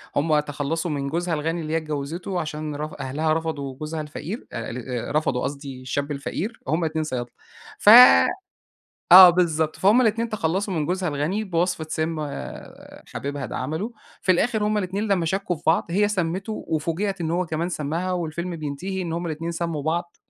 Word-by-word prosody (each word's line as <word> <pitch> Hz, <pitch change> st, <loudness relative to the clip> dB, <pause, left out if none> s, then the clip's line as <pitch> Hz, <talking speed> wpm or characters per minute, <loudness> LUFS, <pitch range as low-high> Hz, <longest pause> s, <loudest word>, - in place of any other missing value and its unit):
هم 150 Hz, +1 st, +3 dB
تخلّصوا 150 Hz, +3 st, -3 dB
من 140 Hz, -1 st, -2 dB
جوزها 170 Hz, +3 st, -1 dB
الغني 165 Hz, +2 st, -1 dB
اللي 155 Hz, 0 st, -4 dB
هي -, -, +3 dB
اتجوزتُه، 160 Hz, +4 st, -4 dB
عشان 155 Hz, -1 st, -4 dB
رف 150 Hz, +1 st, -5 dB
أهلها 150 Hz, +4 st, 0 dB
رفضوا 155 Hz, -4 st, -3 dB
جوزها 155 Hz, +3 st, -5 dB
الفقير 155 Hz, +8 st, -7 dB
آآ، 115 Hz, -, -4 dB
ال 125 Hz, +2 st, -5 dB
رفضوا 135 Hz, -5 st, +1 dB
قصدي 140 Hz, -1 st, -5 dB
الشاب 140 Hz, +3 st, -3 dB
الفقير، 170 Hz, -, -4 dB
هم 160 Hz, +4 st, +1 dB
الاتنين 160 Hz, -1 st, -1 dB
صيادلة، 125 Hz, -5 st, -4 dB, 0.5 s
ف -, -, +5 dB, 1.2 s
آه 185 Hz, -1 st, +12 dB
بالضبط، 160 Hz, -3 st, +1 dB
فهم 210 Hz, +6 st, +4 dB
الاتنين 230 Hz, -1 st, +1 dB
تخلّصوا 195 Hz, 0 st, -1 dB
من 155 Hz, -3 st, -1 dB
جوزها 180 Hz, 0 st, -1 dB
الغني 155 Hz, +9 st, -1 dB
بوصفة 175 Hz, -3 st, -1 dB
سِمّ، 160 Hz, 0 st, -2 dB, 0.9 s
حبيبها 140 Hz, -1 st, -4 dB
ده -, -, -6 dB
عملُه، 160 Hz, -, -3 dB, 0.3 s
في 185 Hz, -, +4 dB
الآخر 215 Hz, +4 st, +1 dB
هم 210 Hz, 0 st, +1 dB
الاتنين 200 Hz, +2 st, -2 dB
لمّا 180 Hz, -5 st, +1 dB
شكّوا 190 Hz, -1 st, -1 dB
في -, -, -17 dB
بعض، 160 Hz, -, +3 dB
هي 205 Hz, +3 st, +2 dB
سمّتُه 190 Hz, +1 st, -2 dB, 0.2 s
وفوجِئَت 170 Hz, +5 st, -1 dB
إن 160 Hz, -, -1 dB
هو 175 Hz, +2 st, 0 dB
كمان 160 Hz, +2 st, -2 dB
سمّها، 170 Hz, +3 st, -2 dB
والفيلم 170 Hz, 0 st, -3 dB
بينتهي 155 Hz, +6 st, -4 dB
إن 170 Hz, -2 st, -4 dB
هم 170 Hz, +1 st, -3 dB
الاتنين 165 Hz, +1 st, -3 dB
سمّوا 165 Hz, -3 st, -3 dB
بعض، 170 Hz, +3 st, -2 dB
165 Hz, 175 wpm, -24 LUFS, 150-180 Hz, 1.2 s, آه